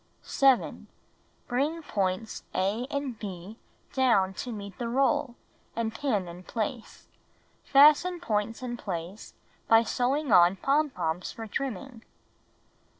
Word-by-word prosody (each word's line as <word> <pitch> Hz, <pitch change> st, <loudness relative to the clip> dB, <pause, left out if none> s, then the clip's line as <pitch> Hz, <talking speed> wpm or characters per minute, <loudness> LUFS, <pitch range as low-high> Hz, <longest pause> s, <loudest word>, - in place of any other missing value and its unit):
7. 270 Hz, -3 st, +2 dB, 0.6 s
Bring 295 Hz, +7 st, -1 dB
points 195 Hz, -4 st, -2 dB
a 205 Hz, +7 st, 0 dB
and 275 Hz, -6 st, -4 dB
h 190 Hz, +1 st, -7 dB, 0.4 s
down 215 Hz, -8 st, +3 dB
to 245 Hz, +5 st, -5 dB
meet 200 Hz, -3 st, -7 dB
the 240 Hz, -, -2 dB
roll, 270 Hz, 0 st, +1 dB, 0.4 s
and 225 Hz, -1 st, -2 dB
pin 220 Hz, -7 st, -1 dB
in 170 Hz, +1 st, -9 dB
place. 220 Hz, +4 st, -5 dB, 0.6 s
Fasten 305 Hz, +6 st, +5 dB
points 225 Hz, -5 st, -2 dB
in 240 Hz, -1 st, -4 dB
place 185 Hz, -1 st, -6 dB, 0.3 s
by 225 Hz, 0 st, +6 dB
sewing 260 Hz, +4 st, 0 dB
on 175 Hz, 0 st, +6 dB
pom 290 Hz, +8 st, +1 dB
poms 170 Hz, -7 st, -3 dB
for 225 Hz, -, -7 dB
trimming. 245 Hz, 0 st, -5 dB
230 Hz, 120 wpm, -28 LUFS, 195-270 Hz, 0.6 s, by